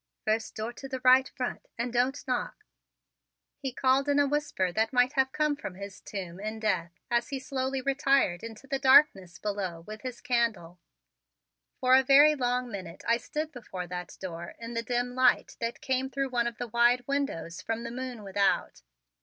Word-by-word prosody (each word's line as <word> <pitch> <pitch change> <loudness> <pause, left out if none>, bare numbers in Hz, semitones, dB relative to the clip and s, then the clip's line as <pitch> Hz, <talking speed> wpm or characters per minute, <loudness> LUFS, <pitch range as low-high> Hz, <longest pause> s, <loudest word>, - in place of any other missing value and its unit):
"First 220 +1 0
door 220 +2 -4
to 270 - -9
the 260 -1 -3
right, 255 +1 +6
front, 250 -1 -5
and 235 +1 -2
don't 260 +4 0
knock," 255 - -3 0.9
he 270 -2 -3
called 265 +3 +2
in 285 - +3
a 285 - +5
whisper 285 -11 0
that 220 +4 0
might 250 +1 +3
have 265 -2 +2
come 300 0 +1
from 280 -11 -7
his 200 0 -9
tomb 185 -3 -6
in 215 +2 -4
death 175 -6 -1 0.2
as 235 0 +1
he 275 - -2
slowly 265 0 -2
retired 275 - +2
into 225 +2 -9
the 270 0 -2
darkness 260 - +5
below 195 -5 -3
with 215 +5 -9
his 255 -2 -6
candle. 220 -8 -1 1.0
For 255 -1 +3
a 265 - +7
very 280 +3 +7
long 250 -3 -1
minute 185 -4 -7
I 235 0 +4
stood 305 +5 -4
before 195 -7 -7
that 180 0 -7
door 170 -2 -7
in 230 0 -7
the 230 - -1
dim 245 +1 -1
light 255 0 +3
that 230 0 -3
came 265 0 0
through 270 0 -2
one 240 -2 +1
of 235 -1 -5
the 245 - -4
wide 240 +2 +3
windows 240 -12 -2
from 225 +3 -3
the 235 - -5
moon 250 -3 -6
without. 195 - 0
245 Hz, 185 wpm, -29 LUFS, 205-265 Hz, 1.0 s, a